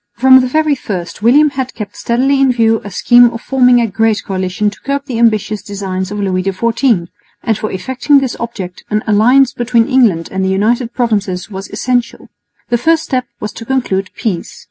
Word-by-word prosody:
From 260 +1 +6
the 255 - 0
very 310 +3 +1
first 185 -9 -5
William 285 +7 +4
had 265 -2 -4
kept 205 -2 -7
steadily 270 +4 0
in 270 -1 +4
view 225 -2 +1
a 205 - -7
scheme 240 +5 +5
of 230 - -7
forming 250 -1 +3
a 235 - +2
great 220 +1 0
coalition 190 +2 -2
to - - -15
curb 280 +1 -2
the 245 -5 -4
ambitious 215 -2 +1
designs 190 -3 -5
of 210 +1 -5
Louis 185 -2 -1
XIV; 215 0 0 0.4
and 225 - +1
for 215 +1 -4
effecting 260 +9 +1
this 265 -3 -1
object 195 -6 -6
an 210 +1 -1
alliance 245 +5 +3
between 235 -1 +1
England 225 -11 +2
and 190 0 -2
the 190 - 0
United 230 +5 0
Provinces 205 -6 -2
was 195 0 -7
essential. 245 -2 -2 0.4
The 240 -1 +1
first 320 +5 +2
step 255 -2 -2
was 210 - -5
to - - -9
conclude 225 -7 -1
peace. 190 -7 -4
230 Hz, 190 wpm, -14 LUFS, 200-255 Hz, 0.4 s, From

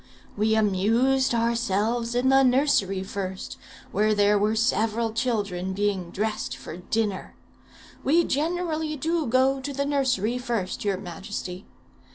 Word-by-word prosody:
We 220 +1 +2
amused 225 +6 +2
ourselves 230 0 0
in 250 +2 +2
the 270 0 +6
nursery 250 -8 +2
first, 190 -1 -5 0.3
where 215 +2 +2
there 205 0 +4
were 210 +2 +2
several 225 0 +1
children 200 -6 -1
being 195 -3 -1
dressed 215 +3 -3
for 160 - -8
dinner. 205 +1 -2 0.7
We 330 +5 +4
generally 315 0 -1
do 320 +1 -1
go 260 +3 +3
to 285 +2 -4
the 280 +1 -2
nursery 255 -5 0
first, 235 -7 -3
your 200 -2 0
majesty. 185 0 -7
225 Hz, 130 wpm, -25 LUFS, 200-260 Hz, 0.7 s, the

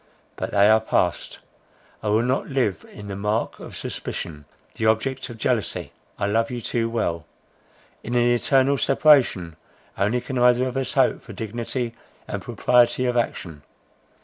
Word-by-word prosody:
But - - -4
they 100 0 +4
are 110 +1 +5
passed. 90 -6 -1 0.6
I 105 - -2
will 110 +2 +3
not 130 +2 -1
live 130 -8 0
the 100 -2 -8
mark 105 +3 -2
of - - -9
suspicion, 75 -3 -6 0.3
the 110 - -1
object 130 +5 0
of 120 - -9
jealousy. 115 -1 -1 0.3
I - - -1
love 115 +3 +1
you 125 - -4
too 115 0 -1
well. 85 - -2 0.7
In 120 - -4
an 120 0 +4
eternal 135 +3 +3
separation 130 - +3 0.4
only 105 +5 +2
can 125 +1 -4
either 125 +1 +4
of 125 - -5
us 135 -1 -2
hope - - +2
for - - -11
dignity 115 +2 -4 0.3
and - - -4
propriety 125 +1 +2
of 125 -1 0
action. 85 -10 -2
115 Hz, 155 wpm, -23 LUFS, 105-125 Hz, 0.7 s, are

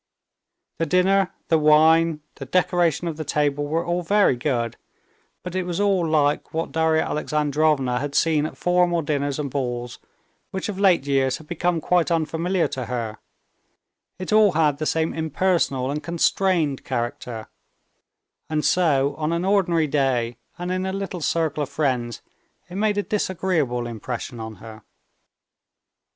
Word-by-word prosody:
The 165 - 0
dinner, 190 +1 +3 0.2
the 160 - +4
wine, 155 +1 +4
the 135 - -8
decoration 175 0 +1
of 160 -2 -4
the 155 - -3
table 145 -1 0
were 165 +3 -1
all 175 +1 0
very 200 -4 +3
good; 120 -3 -1 0.7
but 180 - -6
it 185 - 0
was 175 -1 -3
all 195 -4 +2
like 150 -1 +1
what 165 - -2
Darya 160 0 +2
Alexandrovna 150 -4 0
had 145 +1 -4
seen 155 -2 +2
at - - -11
formal 180 -1 +2
dinners 145 -1 -1
and 145 -3 -3
balls 120 -3 -3 0.5
which 190 +2 -4
of 195 -2 -5
late 185 -8 +4
years 135 -2 +1
had 160 - -14
become 175 +1 -1
quite 175 +1 +1
unfamiliar 165 +2 0
to 130 -3 -4
her; 115 -3 -4 1.0
it 185 +3 -4
all 215 -3 +5
had 150 -3 +2
the 155 - -1
same 160 0 0
impersonal 160 -5 0
and 150 +1 -3
constrained 170 -2 +1
character, 120 -2 -4 1.0
and 155 -1 -1
so 145 -6 +2
on 155 0 -1
an 170 +2 -1
ordinary 175 -5 +2
day 130 -5 0 0.2
and 175 +1 -4
in 185 0 -1
a 190 - -3
little 195 -3 -4
circle 155 -1 0
of 145 - -2
friends 125 -6 -1 0.4
it 180 - -13
made 210 +1 +1
a 205 - +1
disagreeable 170 - -1
impression 120 +1 -6
on 110 -1 -6
her. 110 +2 -11
155 Hz, 155 wpm, -23 LUFS, 140-175 Hz, 1.0 s, all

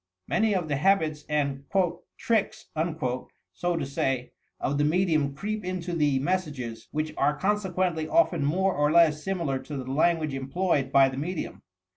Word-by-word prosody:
Many 220 -2 +2
of 175 -4 -1
the 145 -2 0
habits 155 -3 +2
and 140 -2 0 0.5
"tricks," 220 -1 -1
80 160 +1 -1 0.7
to 170 -4 0
say, 135 -2 -1 0.3
of 140 +2 -1
the - - +3
medium 155 -3 +2
creep 210 +6 -3
into 180 -1 -3
the 150 -4 +2
mes 185 +7 +1
sages, 125 -6 -7
which 155 +1 -2
are 150 0 +2
consequently 185 -4 0
often 185 - +3
more 185 +6 +2
or 150 +1 +2
less 155 -2 +4
similar 170 -9 -1
to 145 +1 -7
the 130 - -4
language 155 0 +2
employed 135 +1 0
by 135 -1 +6
the 130 - -7
medium. 165 +4 -4
155 Hz, 160 wpm, -27 LUFS, 140-185 Hz, 0.7 s, by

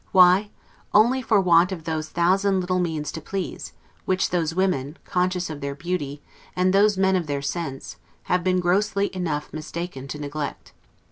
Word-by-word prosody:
Why? 185 +2 +6 0.5
only 240 +5 +5
for 220 -4 +3
want 180 -1 +4
of 175 -4 -5
those 155 -1 -3
thousand 190 +3 +2
little 185 0 0
means 160 -4 -2
to 160 - -7
please, 190 +4 -5 0.3
which 185 0 +1
those 165 -2 0
women, 175 -5 0
conscious 180 0 0
of 155 -2 -7
their 140 0 -3
beauty, 150 -3 -4 0.3
and 185 +1 +2
those 205 0 +4
men 190 0 +3
of 175 -4 -1
their 140 -1 -2
sense, 140 -3 -4 0.3
have 180 -1 0
been 185 0 +2
grossly 200 +2 +1
enough 160 -5 -3
mistaken 155 -2 -6
to 150 - -5
neglect. 145 0 -5
180 Hz, 165 wpm, -24 LUFS, 155-190 Hz, 0.5 s, Why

